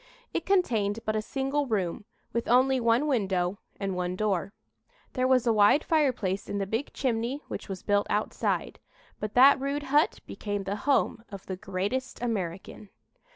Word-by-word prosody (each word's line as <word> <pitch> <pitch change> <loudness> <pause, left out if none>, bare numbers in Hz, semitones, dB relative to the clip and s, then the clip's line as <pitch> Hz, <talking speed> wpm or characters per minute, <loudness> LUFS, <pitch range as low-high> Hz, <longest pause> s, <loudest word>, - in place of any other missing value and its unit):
It - - -2
contained 225 - +2
but 215 - 0
a 215 - +1
single 270 +5 -1
room, 200 -4 -2 0.3
with 235 - -1
only 260 +2 +4
one 235 +4 +3
window 195 -8 0 0.2
and 195 -2 -2
one 180 0 -2
door. 195 -2 -1 0.6
There 255 -1 +1
was 255 -2 +3
a 230 - +3
wide 210 +7 +5
fireplace 250 - 0
in 205 - -2
the 200 - -1
big 225 +8 -3
chimney 250 +3 -2
which - - -6
was 190 -2 -6
built 205 0 +1
outside. 210 +1 -1 0.4
But 210 0 -5
that 265 +2 +7
rude 280 +2 -2
hut 295 +3 +2
became 205 -1 -4
the 195 +1 -2
home 235 -4 +2
of 200 -3 -9
"the 190 - -4
greatest 205 +7 -3
American." 195 -3 -4
220 Hz, 165 wpm, -28 LUFS, 195-260 Hz, 0.6 s, that